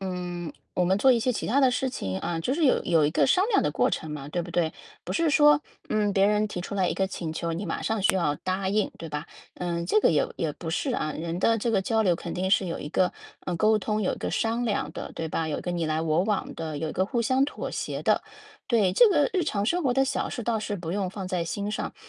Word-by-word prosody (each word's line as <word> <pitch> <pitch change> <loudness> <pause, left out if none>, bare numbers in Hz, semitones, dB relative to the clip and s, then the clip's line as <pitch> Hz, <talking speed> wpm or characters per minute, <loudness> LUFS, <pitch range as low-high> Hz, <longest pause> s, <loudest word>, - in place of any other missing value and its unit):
嗯， 180 -3 -4 0.2
“我 180 - +2
们 190 +2 +2
做 260 +5 +6
一 240 - +3
些 250 +2 +1
其 - - -3
他 265 +6 +3
的 265 -2 +5
事 265 +1 0
情“， 95 - -3
啊， 170 0 -2
就 245 - -1
是 315 +2 +1
有 260 - +3
有 165 -4 +3
一 - - +1
个 - - +3
商 370 +7 +4
量 420 - +3
的 - - +1
过 - - +2
程 160 - -3
嘛， 145 -2 -6
对 175 +3 -2
不 175 - -8
对？ 170 -2 0 0.3
不 - - -4
是 330 -2 +2
说， 295 0 +6 0.3
嗯， 210 -1 +1
别 195 0 +4
人 210 +1 +2
提 180 - -4
出 190 - -6
来 190 -3 +1
一 - - 0
个 190 - +1
请 170 -4 -5
求， 165 +1 -3
你 170 +5 -3
马 170 - -3
上 220 -2 -1
需 190 - +3
要 150 -5 +1
答 185 +5 -2
应， 205 +1 +1
对 165 - -7
吧？ 150 -1 -5 0.3
嗯， 170 -1 -3
这 215 - +3
个 - - +4
也 150 - +2
也 160 - -1
不 165 +2 -8
是， 175 - -1
啊， 155 - -1
人 165 +2 -4
的 225 +4 +3
这 235 +2 0
个 205 -4 +2
交 220 +3 +1
流 180 -4 +3
肯 170 - -6
定 185 +1 -1
是 195 -1 +3
有 170 - -3
一 145 - -5
个， 180 +4 +1 0.3
嗯， 180 - -1
沟 215 +5 +4
通， 215 +1 -1
有 185 - 0
一 - - -11
个 - - -3
商 225 +4 0
量 205 -9 -1
的， - - -7
对 160 - -3
吧？ 160 +1 -1
有 150 - -1
一 - - -5
个 180 - -3
你 170 -2 -1
来 155 +1 0
我 160 +1 +2
往 210 -2 -1
的， 160 -2 -4
有 160 +1 -2
一 - - -6
个 185 - 0
互 235 +3 -1
相 260 +4 +3
妥 290 - -5
协 - - -4
的。 - - +2 0.5
对， 215 -7 +3
这 475 - +7
个 305 -4 +3
日 365 -4 +1
常 205 -9 -1
生 350 +11 +1
活 250 - +2
的 270 +1 +4
小 270 +1 -1
事 245 - -5
倒 230 0 0
是 210 -1 -3
不 170 -3 -6
用 195 +1 -1
放 190 0 -6
在 180 -2 -1
心 200 +5 -3
上。 215 - -4
190 Hz, 310 characters per minute, -26 LUFS, 170-225 Hz, 0.5 s, 这